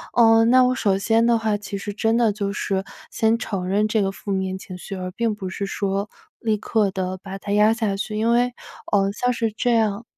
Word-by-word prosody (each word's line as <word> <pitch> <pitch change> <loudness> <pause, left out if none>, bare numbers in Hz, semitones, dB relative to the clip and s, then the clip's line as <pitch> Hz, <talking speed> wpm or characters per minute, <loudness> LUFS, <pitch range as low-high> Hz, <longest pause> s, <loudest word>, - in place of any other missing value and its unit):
呃， 225 -1 +6
那 255 +2 +6
我 250 0 +3
首 200 -6 +1
先 225 +3 +2
的 235 0 +4
话 220 -2 0
其 205 -1 -5
实 205 +1 -5
真 225 +2 +1
的 230 -3 +3
就 200 -1 -2
是 195 -1 -2 0.3
先 225 +1 +2
承 195 -6 -4
认 205 +3 +2
这 215 0 +1
个 195 -1 0
负 200 +1 -7
面 190 -1 -1
情 185 -1 -9
绪， 180 +2 -7
而 185 -1 -5
并 225 +2 -1
不 190 -2 -6
是 200 +1 -4
说 200 +1 -2 0.3
立 220 -2 0
刻 210 -1 +1
地 185 0 -3
把 195 0 -7
它 200 +1 -6
压 210 +1 +5
下 220 -4 -1
去， 210 +2 -4
因 225 +2 +2
为， 245 +1 +3 0.4
呃， 195 -1 +3
像 245 +4 0
是 230 -2 -1
这 240 +3 0
样 220 0 +1
210 Hz, 250 characters per minute, -22 LUFS, 195-225 Hz, 0.4 s, 呃